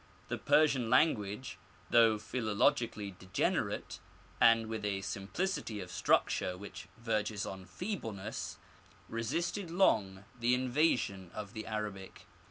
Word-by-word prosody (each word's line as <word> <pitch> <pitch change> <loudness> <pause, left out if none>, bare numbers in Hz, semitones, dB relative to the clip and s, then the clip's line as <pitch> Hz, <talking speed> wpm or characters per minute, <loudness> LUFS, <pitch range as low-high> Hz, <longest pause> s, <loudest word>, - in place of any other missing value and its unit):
The - - -2
Persian 135 -7 +3
language, 125 -4 +2 0.3
though 115 -2 +6
phiiologically 105 -2 0
degenerate, 95 0 -1 0.4
and 115 -1 +6
with 110 -1 -4
a 100 -1 -1
simplicity 110 - -3
of 90 -2 -7
struc - - +3
ture 90 0 -3
which 100 +2 -9
verges 110 -3 -1
on 95 -1 -7
feebleness, 110 - -5 0.5
resisted 165 - -2
long 100 - +2
the 120 +2 +3
invasion 125 - +1
of 105 -1 -6
the 110 -2 -6
Arabic. 105 -3 -5
110 Hz, 115 wpm, -33 LUFS, 100-125 Hz, 0.5 s, though